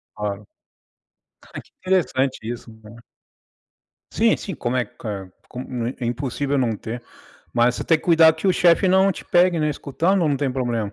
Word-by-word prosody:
Claro. 105 Hz, -1 st, -4 dB
Ah, -, -, -22 dB, 1.2 s
que -, -, -27 dB, 0.2 s
interessante 135 Hz, -8 st, +1 dB
isso 120 Hz, -1 st, -7 dB
né. 105 Hz, +1 st, -13 dB, 1.2 s
Sim, 225 Hz, 0 st, +3 dB
sim. 190 Hz, -, -6 dB
Como 120 Hz, -2 st, -2 dB
é 125 Hz, -, +1 dB
q 100 Hz, -6 st, -7 dB, 0.2 s
como 125 Hz, -2 st, -5 dB
é 125 Hz, -, -4 dB
é 120 Hz, -, -3 dB
impossível 135 Hz, +3 st, -2 dB
não 120 Hz, -4 st, +1 dB
ter, 115 Hz, +3 st, -6 dB, 0.5 s
mas 120 Hz, +1 st, +3 dB
você -, -, -4 dB
tem 165 Hz, -, +3 dB
cuidado 160 Hz, -1 st, +5 dB
que 160 Hz, -, -3 dB
o 190 Hz, -, +5 dB
chefe 175 Hz, +2 st, +4 dB
não 190 Hz, +1 st, +4 dB
te -, -, -6 dB
pegue, 175 Hz, -1 st, +3 dB
né, 150 Hz, -1 st, +1 dB
escutando 170 Hz, +7 st, 0 dB
ou 155 Hz, -, +2 dB
não 140 Hz, -, +1 dB
tem 135 Hz, -1 st, -1 dB
problema? 120 Hz, -5 st, -2 dB
130 Hz, 180 wpm, -22 LUFS, 120-165 Hz, 1.2 s, cuidado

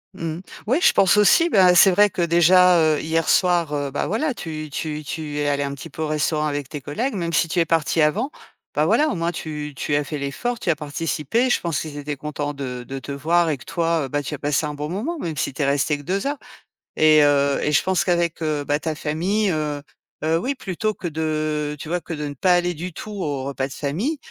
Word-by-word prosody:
Mmh. 165 Hz, 0 st, -4 dB, 0.3 s
Ouais, 260 Hz, +8 st, +2 dB
je -, -, +5 dB
pense 190 Hz, +1 st, +4 dB
aussi. 330 Hz, -, +5 dB
Bah, 185 Hz, -, +5 dB
c'est 180 Hz, +2 st, +7 dB
vrai 205 Hz, +3 st, +5 dB
que 185 Hz, -, -3 dB
déjà, 175 Hz, +2 st, +5 dB, 0.2 s
heu, -, -, -3 dB
hier 160 Hz, 0 st, 0 dB
soir, 175 Hz, -4 st, +2 dB
heu, 145 Hz, -1 st, -1 dB
bah, 145 Hz, -, -2 dB
voilà 250 Hz, -, -1 dB
tu 155 Hz, -5 st, -6 dB
tu 155 Hz, +1 st, -4 dB
tu 150 Hz, 0 st, -5 dB
es 145 Hz, -, 0 dB
allé 145 Hz, 0 st, +1 dB
un 140 Hz, 0 st, -3 dB
petit 140 Hz, -, -9 dB
peu 160 Hz, -, -5 dB
au -, -, -1 dB
restaurant 155 Hz, 0 st, 0 dB
avec 145 Hz, -3 st, -3 dB
tes 150 Hz, -, -6 dB
collègues, 215 Hz, -, -3 dB
même 170 Hz, -3 st, -2 dB
si 165 Hz, +2 st, +3 dB
tu 175 Hz, +2 st, -1 dB
es 165 Hz, -, +3 dB
parti 165 Hz, 0 st, +1 dB
avant, 185 Hz, -, +2 dB, 0.5 s
bah, -, -, +2 dB
voilà, 305 Hz, +1 st, +3 dB
au -, -, -2 dB
moins 170 Hz, 0 st, -1 dB
tu 150 Hz, -3 st, -6 dB
tu 145 Hz, +2 st, -1 dB
as 145 Hz, -, +1 dB
fait 150 Hz, +1 st, -5 dB
l'effort, 225 Hz, -, -3 dB
tu -, -, -3 dB
as 165 Hz, -, +3 dB
participé, 160 Hz, -, -1 dB
je -, -, +2 dB
pense 170 Hz, -4 st, -2 dB
qu'ils 150 Hz, -2 st, -6 dB
étaient 145 Hz, +1 st, -4 dB
contents 145 Hz, +1 st, -4 dB
de 125 Hz, -3 st, -5 dB
de 135 Hz, 0 st, -5 dB
te 140 Hz, -, -8 dB
voir 165 Hz, +4 st, +1 dB
et 150 Hz, -, -1 dB
que 125 Hz, -, -15 dB
toi, 165 Hz, -2 st, 0 dB
heu, -, -, -5 dB
bah, 145 Hz, +2 st, -1 dB
tu 145 Hz, +2 st, -5 dB
as -, -, -11 dB
passé 150 Hz, +1 st, 0 dB
un 150 Hz, -, -5 dB
bon 150 Hz, +1 st, -4 dB
moment, 235 Hz, -, -3 dB
même 165 Hz, -, -4 dB
si 140 Hz, -, -1 dB
tu 135 Hz, +2 st, -3 dB
es -, -, +2 dB
resté 140 Hz, +2 st, +1 dB
que 145 Hz, -, -12 dB
2 195 Hz, -, -1 dB
heures. 290 Hz, +1 st, -2 dB, 0.6 s
Et 155 Hz, -1 st, +6 dB
heu, 140 Hz, -1 st, +3 dB
et 150 Hz, -, 0 dB
je -, -, +4 dB
pense 185 Hz, -2 st, +1 dB
qu'avec, 170 Hz, -2 st, 0 dB
heu, 155 Hz, -2 st, -1 dB
bah, 145 Hz, +1 st, 0 dB
ta 160 Hz, 0 st, -3 dB
famille, 180 Hz, +8 st, 0 dB
heu, 150 Hz, -2 st, -2 dB, 0.4 s
heu, 160 Hz, +1 st, +2 dB
oui 270 Hz, +9 st, -2 dB
plutôt 215 Hz, -1 st, -2 dB
que 175 Hz, -, -5 dB
de, 155 Hz, -1 st, -2 dB
tu 150 Hz, -, -8 dB
vois, 175 Hz, +1 st, 0 dB
que 170 Hz, -, -7 dB
de 150 Hz, -1 st, -4 dB
ne -, -, -6 dB
pas 180 Hz, +7 st, +3 dB
aller 175 Hz, 0 st, +1 dB
du 175 Hz, +2 st, -6 dB
tout 215 Hz, -, -8 dB
aux 150 Hz, -10 st, -3 dB
repas 135 Hz, -1 st, -2 dB
de -, -, -8 dB
famille, 190 Hz, -, -2 dB
155 Hz, 255 wpm, -22 LUFS, 145-180 Hz, 0.6 s, c'est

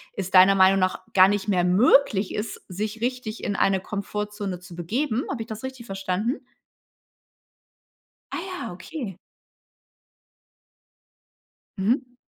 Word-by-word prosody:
es 190 Hz, -2 st, -4 dB
deiner 190 Hz, +1 st, +7 dB
Meinung 190 Hz, 0 st, +5 dB
nach 185 Hz, 0 st, 0 dB
gar 185 Hz, -1 st, +8 dB
nicht 205 Hz, -1 st, -1 dB
mehr 185 Hz, -4 st, +2 dB
möglich 200 Hz, +2 st, +4 dB
ist, 210 Hz, 0 st, -4 dB
sich 210 Hz, +4 st, -4 dB
richtig 245 Hz, -2 st, -3 dB
in 205 Hz, -, -1 dB
eine 195 Hz, -1 st, +2 dB
Komfortzone 205 Hz, -1 st, -4 dB
zu 175 Hz, -1 st, -12 dB
begeben. 230 Hz, -, -1 dB
Habe 250 Hz, -, -3 dB
ich -, -, -18 dB
das 220 Hz, +1 st, -7 dB
richtig 260 Hz, -2 st, -7 dB
verstanden? 195 Hz, +4 st, -2 dB, 1.9 s
Ah -, -, -3 dB
ja, 370 Hz, -, -6 dB
okay. 195 Hz, -, -7 dB, 2.6 s
Mhm. 245 Hz, +6 st, 0 dB
205 Hz, 120 wpm, -25 LUFS, 190-235 Hz, 2.6 s, gar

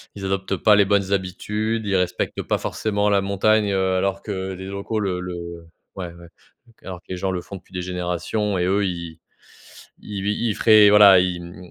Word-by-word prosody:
ils 100 Hz, -1 st, -7 dB
adoptent 95 Hz, 0 st, -1 dB
pas 105 Hz, +4 st, +4 dB
les 100 Hz, -1 st, +4 dB
bonnes 100 Hz, -1 st, +1 dB
habitudes. 105 Hz, +4 st, -2 dB
Ils 100 Hz, -1 st, 0 dB
respectent 90 Hz, -1 st, -1 dB
pas -, -, -1 dB
forcément 105 Hz, -1 st, -1 dB
la 100 Hz, -1 st, +3 dB
montagne, 100 Hz, +2 st, +2 dB
heu, 95 Hz, -1 st, +1 dB
alors 95 Hz, +1 st, -1 dB
que, 105 Hz, -, -5 dB
heu, 95 Hz, 0 st, -4 dB
les 95 Hz, -, -8 dB
locaux 100 Hz, +3 st, -4 dB
le 95 Hz, -3 st, -2 dB
le, 90 Hz, 0 st, -5 dB
heu 85 Hz, -1 st, -9 dB, 0.3 s
ouais 90 Hz, -3 st, -6 dB
ouais, 85 Hz, 0 st, -14 dB, 0.6 s
alors 90 Hz, -2 st, -7 dB
que -, -, -49 dB
les 95 Hz, -, -4 dB
gens 95 Hz, +1 st, -2 dB
le 90 Hz, -, -3 dB
font 100 Hz, -, -10 dB
depuis 95 Hz, -, -21 dB
des 90 Hz, -1 st, -4 dB
générations 90 Hz, +3 st, -2 dB
et 90 Hz, -, 0 dB
eux 100 Hz, +2 st, +1 dB
ils 85 Hz, -3 st, -5 dB, 0.8 s
ils 100 Hz, -2 st, -6 dB
ils 105 Hz, +1 st, -1 dB
feraient 110 Hz, -2 st, +6 dB
voilà 100 Hz, -3 st, +8 dB
ils, 90 Hz, -1 st, -1 dB
mmh 85 Hz, 0 st, -11 dB
95 Hz, 210 wpm, -22 LUFS, 90-105 Hz, 0.8 s, voilà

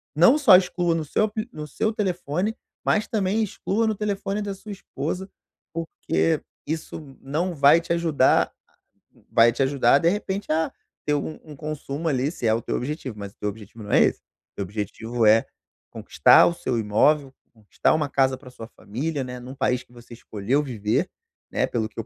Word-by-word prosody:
não 175 Hz, -, +6 dB
só 260 Hz, -11 st, +7 dB
exclua 180 Hz, -2 st, 0 dB
no 165 Hz, -, -1 dB
seu 180 Hz, -, +1 dB
apli 215 Hz, +2 st, -4 dB
no 150 Hz, -1 st, -6 dB
seu 220 Hz, +9 st, -1 dB
telefone, 185 Hz, 0 st, -1 dB, 0.3 s
mas 215 Hz, -, +2 dB
também 215 Hz, -1 st, 0 dB
exclua 215 Hz, +2 st, -1 dB
no 220 Hz, -, 0 dB
telefone 200 Hz, 0 st, -2 dB
da 205 Hz, -1 st, -3 dB
sua 210 Hz, +2 st, -10 dB
esposa, 185 Hz, +1 st, -5 dB, 0.4 s
porque 165 Hz, -1 st, -1 dB, 0.3 s
isso 155 Hz, -3 st, -6 dB
não 165 Hz, +7 st, -2 dB
vai 145 Hz, +3 st, +6 dB
te 170 Hz, -, -7 dB
ajudar 165 Hz, -6 st, +3 dB, 0.8 s
vai 115 Hz, +1 st, +6 dB
te 120 Hz, -, -3 dB
ajudar, 135 Hz, -1 st, +3 dB
de 165 Hz, -, +3 dB
repente, 195 Hz, -1 st, -3 dB
a 160 Hz, +1 st, +1 dB, 0.3 s
ter 150 Hz, -, +1 dB
um 150 Hz, +2 st, -4 dB
um 150 Hz, -2 st, -11 dB
consumo, 150 Hz, +1 st, -5 dB
ali, 135 Hz, +1 st, 0 dB
se 120 Hz, -, -3 dB
é 110 Hz, -, +4 dB
o 115 Hz, -, 0 dB
teu -, -, -2 dB
objetivo, 130 Hz, -3 st, -5 dB
mas 100 Hz, -1 st, -7 dB
o -, -, -40 dB
teu 105 Hz, -, -2 dB
objetivo 105 Hz, +1 st, -11 dB
não 100 Hz, -, -7 dB
é -, -, +5 dB
esse. -, -, +2 dB
O -, -, -75 dB
teu 100 Hz, -, -2 dB
objetivo 110 Hz, +4 st, -3 dB
é, 110 Hz, +1 st, +5 dB, 0.5 s
conquistar -, -, +5 dB
o 175 Hz, -, +1 dB
seu 125 Hz, -7 st, -2 dB
imóvel, 135 Hz, +7 st, +2 dB, 0.2 s
conquistar 110 Hz, -3 st, 0 dB
uma 150 Hz, -2 st, 0 dB
casa 130 Hz, -1 st, +2 dB
pra 130 Hz, -, -13 dB
sua 115 Hz, -3 st, -10 dB
família 135 Hz, +8 st, -4 dB
né, 125 Hz, 0 st, -7 dB
num 125 Hz, +2 st, -9 dB
país 130 Hz, -2 st, 0 dB
que -, -, -25 dB
você 120 Hz, 0 st, -13 dB
escolheu 115 Hz, +4 st, -1 dB
viver, 110 Hz, -6 st, -1 dB, 0.4 s
né, -, -, +1 dB
pelo 110 Hz, -2 st, -1 dB
que 115 Hz, -, -10 dB
eu -, -, 0 dB
o -, -, -24 dB
145 Hz, 195 wpm, -24 LUFS, 120-180 Hz, 0.8 s, só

